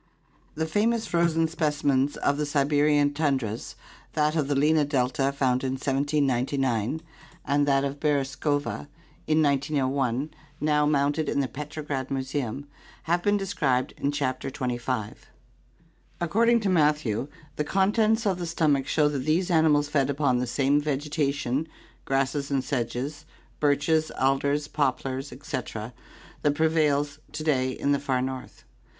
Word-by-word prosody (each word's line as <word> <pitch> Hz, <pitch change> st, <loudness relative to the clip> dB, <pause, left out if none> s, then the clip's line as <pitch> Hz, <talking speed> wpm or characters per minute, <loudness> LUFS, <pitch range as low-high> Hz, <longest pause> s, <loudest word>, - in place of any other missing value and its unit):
The 160 Hz, +1 st, -1 dB
famous 220 Hz, +7 st, +1 dB
frozen 170 Hz, -1 st, +2 dB
specimens 145 Hz, -4 st, 0 dB
of 145 Hz, -, +1 dB
the 150 Hz, -, 0 dB
Siberian 145 Hz, 0 st, +2 dB
tundras, 135 Hz, -8 st, -1 dB, 0.4 s
that 150 Hz, 0 st, +1 dB
of 150 Hz, -4 st, +1 dB
the 145 Hz, -, 0 dB
Lena 150 Hz, +2 st, +3 dB
delta 135 Hz, -1 st, 0 dB
found 130 Hz, -2 st, 0 dB
in 130 Hz, -1 st, -1 dB
1799, 135 Hz, -1 st, 0 dB, 0.4 s
and 145 Hz, +1 st, +2 dB
that 135 Hz, -1 st, +3 dB
of 140 Hz, +1 st, -4 dB
ORGANIC 145 Hz, -3 st, +2 dB, 0.2 s
EVOLUTION 145 Hz, -1 st, +2 dB
Beresovka -, -, -5 dB, 0.4 s
in 155 Hz, 0 st, +3 dB
iooi 140 Hz, -2 st, 0 dB, 0.3 s
now 150 Hz, -1 st, +2 dB
mounted 145 Hz, +1 st, +1 dB
in 140 Hz, -, 0 dB
the 135 Hz, -, +1 dB
Petrograd 145 Hz, 0 st, -5 dB
Museum, 135 Hz, -1 st, -3 dB, 0.4 s
have 170 Hz, +1 st, +1 dB
been 205 Hz, +2 st, +2 dB
described 165 Hz, -11 st, 0 dB
in 140 Hz, -, 0 dB
Chapter 135 Hz, -2 st, -2 dB
XXV. 125 Hz, -4 st, -3 dB, 1.1 s
According 230 Hz, +7 st, +3 dB
to 205 Hz, -, 0 dB
Matthew, 150 Hz, -, +2 dB, 0.3 s
the 150 Hz, -, +1 dB
contents 215 Hz, +6 st, +2 dB
of 190 Hz, -3 st, +1 dB
the 175 Hz, -, -3 dB
stomach 150 Hz, -5 st, +1 dB
show 150 Hz, -2 st, +3 dB
that 145 Hz, -2 st, -1 dB
these 160 Hz, +7 st, 0 dB
animals 155 Hz, -3 st, +4 dB
fed 140 Hz, -2 st, +1 dB
upon 140 Hz, -3 st, +1 dB
the 125 Hz, -, -1 dB
same 140 Hz, +4 st, +2 dB
vegetation, 145 Hz, -1 st, -1 dB, 0.4 s
grasses 135 Hz, +1 st, 0 dB
and 135 Hz, -2 st, 0 dB
sedges, 135 Hz, +4 st, -3 dB, 0.3 s
birches, 155 Hz, +2 st, +2 dB
alders, 140 Hz, +2 st, +1 dB
poplars, 135 Hz, -1 st, -1 dB
etc., 120 Hz, -4 st, -5 dB, 0.5 s
that 145 Hz, -1 st, +2 dB
prevails 150 Hz, -2 st, +1 dB
to 155 Hz, 0 st, -4 dB
day 130 Hz, -4 st, +1 dB
in 140 Hz, +2 st, -1 dB
the 140 Hz, -, +2 dB
far 135 Hz, -2 st, 0 dB
north. 130 Hz, 0 st, -6 dB
145 Hz, 140 wpm, -26 LUFS, 135-155 Hz, 1.1 s, animals